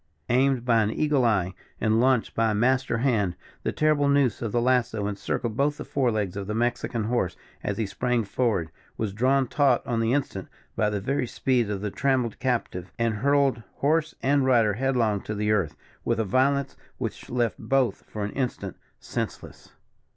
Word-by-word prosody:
Aimed 130 0 +2
by 115 -2 +4
an 105 - +1
eagle 145 +2 +1
eye, 95 -5 +1 0.3
and 110 +1 +2
launched 125 -1 +2
by 115 0 +2
a 105 - 0
master 125 +2 +2
hand, 110 -8 +1 0.3
the - - -1
terrible 155 -2 +2
noose 140 -5 +2
of 115 -3 -2
the 120 - +1
lasso 120 -4 +1
encircled 105 +3 -2
both 145 +3 +1
the - - -7
forelegs 110 -9 0
of 100 -1 -5
the 105 - -2
Mexican 120 -1 -1
horse 105 -6 0 0.3
as - - -2
he 110 - 0
sprang 120 +3 0
forward, 100 -6 -1 0.3
was 105 -3 -2
drawn 130 +5 +2
taut 135 -2 +2
on 115 -2 -1
the 115 0 +1
instant 130 -9 -1 0.3
by 105 - +2
the 105 -1 -2
very 130 +5 -1
speed 120 -3 0
of 100 -2 -3
the 105 -1 -3
trammelled 130 -4 0
captive, 115 -8 -2
and 115 -2 0
hurled 140 0 +2
horse 155 +2 +1
and 140 +1 +3
rider 115 -5 +4
headlong 115 -4 +1
to 105 - -5
the 105 +1 0
earth, 95 -8 +1 0.3
with - - 0
a 110 - +1
violence 135 +6 +1 0.2
which - - -5
left 120 -2 0
both 135 -6 +1
for 105 - -4
an 100 - -3
instant 130 -3 -3 0.2
senseless. - - -6
120 Hz, 185 wpm, -26 LUFS, 105-130 Hz, 0.3 s, by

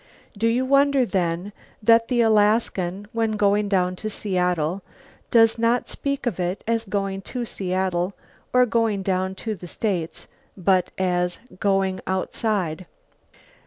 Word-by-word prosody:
Do 220 +3 +1
you 245 +3 +1
wonder, 275 -1 +4
then, 180 -1 -1 0.3
that 230 +1 +5
the 245 -2 +2
Alaskan, 210 -3 +2
when 225 -1 0
going 205 0 +2
down 185 -2 +1
to 215 - -4
Seattle, 180 -4 -1 0.5
does 225 -1 +4
not 235 +2 +1
speak 280 -1 -3
of 240 -5 -2
it 180 +2 -2
as 230 0 0
going 195 -1 -2
to 245 -2 -3
Seattle 185 -2 -2 0.4
or 250 0 +5
going 225 -4 0
down 190 0 -1
to 220 +3 -4
the 180 -3 -9
States 180 -4 -3 0.3
but 185 -1 +2
as 180 -1 0 0.2
"going 195 -1 +1
outside"? 190 -2 -1
200 Hz, 135 wpm, -23 LUFS, 185-230 Hz, 0.5 s, that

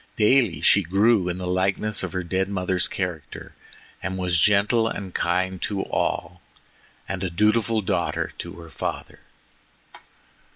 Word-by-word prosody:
Daily 105 - +3
she 100 - +5
grew 95 +2 +2
in 90 - -3
the 90 - -5
likeness 95 +3 0
of 95 - -4
her 95 -1 -2
dead 95 +2 -1
mother's 90 -2 +1
character, 90 -6 -5 0.5
and 95 +1 -3
was 90 -2 +1
gentle 105 +4 +3
and 100 -4 -5
kind 90 +1 -1
to 100 -2 -1
all, 85 +2 -2 0.7
and 95 -1 -4
a 95 - -1
dutiful 110 +4 +1
daughter 95 -3 -1
to - - -6
her 85 -1 -12
father. - - -5
95 Hz, 140 wpm, -24 LUFS, 90-105 Hz, 0.7 s, she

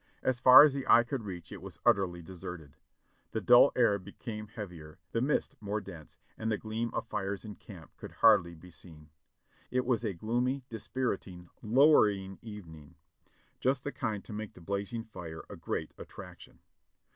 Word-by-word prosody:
As 130 -2 0
far 130 +2 +10
as 150 -2 +4
the 135 -1 -3
eye 120 - +7
could 120 -2 -4
reach 90 -4 -8
it 100 -4 -8
was 95 -1 -10
utterly 95 -7 +2
deserted. 80 -4 -9 0.6
The - - 0
dull - - +7
air 100 0 +3
became 105 +3 -8
heavier, 90 -7 -9
the 115 - 0
mist 140 +3 0
more 105 0 -2
dense, 85 -7 -12 0.2
and 110 0 -1
the 105 - +1
gleam 110 +2 -3
of - - -2
fires 100 -1 -4
in 105 - -7
camp 90 -7 -14
could - - -10
hardly 85 0 +4
be 90 +3 -14
seen. 80 -2 -13 0.6
It 125 0 0
was 120 -2 +1
a 105 -5 -2
gloomy, 125 +8 -1
dispiriting, 100 -7 -4
lowering 105 -6 +4
evening; 85 -8 -11 0.6
just 130 +1 +1
the 145 - -3
kind 110 -8 -3
to 110 - -9
make 105 0 -6
the - - -13
blazing 100 +6 -3
fire 85 -7 -9
a - - -7
great - - -4
attraction. - - -11
105 Hz, 170 wpm, -31 LUFS, 90-120 Hz, 0.6 s, far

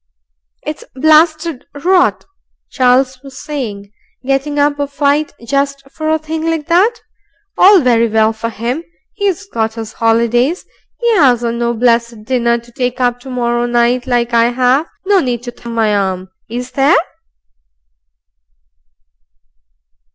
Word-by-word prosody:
"It's 300 - -6
blasted 310 0 +2
rot," 360 +5 +2 0.5
Charles 255 0 +2
was 275 -1 -11
saying, 210 -9 -6 0.3
"getting 275 +2 -1
up 290 0 +1
a 285 - -1
fight 285 +1 0
just 275 +1 -1
for 310 0 -3
a 315 - +3
thing 315 +1 -5
like 325 -2 -2
that; 400 +8 +2 0.5
all 385 -1 +6
very 235 -3 +3
well 220 0 +2
for 230 +1 -4
'im. 240 +9 -3 0.4
'E's 400 -1 0
got 225 - -3
'is 225 -1 -6
'olidays; 235 +7 +2 0.4
'e 455 -3 +3
'asn't 240 -6 +2
no 235 0 0
blessed 235 -1 +1
dinner 235 0 +1
to 235 0 -14
take 250 0 -3
up 245 -1 +1
to 265 - -11
morrow 240 -1 -1
night 240 +1 +1
like 240 -1 0
I 230 0 +4
'ave. 255 +5 +1 0.2
No 400 0 +4
need 245 -6 -2
to 245 -1 -7
numb 235 -1 -6
my 220 -2 +2
arm, 190 -2 -2 0.2
IS 245 +2 -5
there?" 275 0 +3
250 Hz, 140 wpm, -15 LUFS, 235-295 Hz, 0.5 s, all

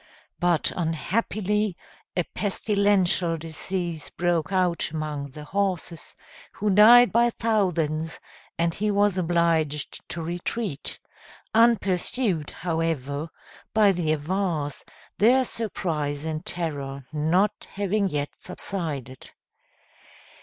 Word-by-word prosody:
But 175 -2 +3
unhappily 200 +4 -1 0.4
a 180 - +3
pestilential 195 -3 +1
disease 165 +1 -4
broke 175 -2 0
out 180 -3 +1
among 150 -2 -4
the 150 +3 -10
horses, 180 -1 -2 0.4
who 210 0 0
died 235 +5 +8
by 235 +1 +4
thousands, 170 -9 0 0.4
and 170 0 +1
he 210 +4 -1
was 205 -1 +3
obliged 165 -4 +1
to 165 - -4
retreat, 175 0 -3 0.6
unpursued, 205 - +2
however, 160 -3 -2 0.5
by 210 -2 +6
the 170 -4 0
Avars, 155 -2 -2 0.4
their 255 +5 +5
surprise 155 -11 -2
and 160 0 -3
terror 140 -6 -3
not 170 +7 +1
having 200 0 +1
yet 145 -2 -2
subsided. 150 - -5
175 Hz, 95 wpm, -25 LUFS, 155-200 Hz, 0.6 s, died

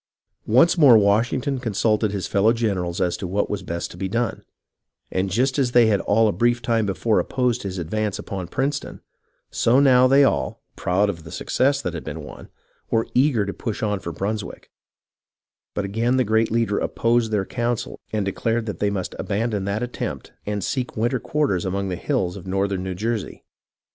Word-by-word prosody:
Once 145 +10 +4
more 135 -7 +8
Washington 120 +7 +1
consulted 110 -2 +1
his 100 -2 -3
fellow 105 +3 +3
generals 95 -7 -1
as 90 -1 +1
to 95 - -5
what 100 +3 -1
was 105 -2 -2
best 85 0 -4
to - - -11
be 95 +1 -2
done, 115 +3 -2 0.7
and 95 +1 0
just 130 +8 +1
as 125 -3 +1
they 120 -1 +6
had 105 -3 +2
all 110 +2 +3
a - - +2
brief 120 +2 +2
time 115 -3 0
before 105 +3 +1
opposed 125 -3 0
his 95 -1 -5
advance 105 +4 -2
upon 95 -3 -5
Princeton, 140 - -3 0.5
so 120 +3 +3
now 130 -2 +6
they 135 +2 +6
all, 65 - 0 0.2
proud 95 +4 +1
of 85 -5 -4
the 80 - -10
success 135 - 0
that 90 - -2
had 80 - -5
been - - -6
won, - - -11 0.4
were 115 0 +1
eager 125 -5 +3
to 100 - -4
push 110 -3 -4
on 105 -2 0
for 85 - -5
Brunswick; 105 +5 -5 1.0
but 105 - -1
again 115 +6 0
the 130 - +3
great 110 0 +2
leader 115 -3 +1
opposed 115 0 +1
their 100 -3 0
counsel 120 +1 -3
and 105 -2 -1
declared 115 +4 -1
that 105 - -5
they 105 - +1
must 100 -2 -3
abandon 105 -1 -1
that 100 +3 -1
attempt 125 - -5
and 105 -2 -2
seek 130 -4 -3
winter 120 +3 +1
quarters 140 - 0
among 100 +1 -2
the 90 - -2
hills 95 - -1
of 95 -2 -10
northern 95 0 -1
New 95 0 -4
Jersey. 110 +2 -3
110 Hz, 190 wpm, -23 LUFS, 100-120 Hz, 1.0 s, more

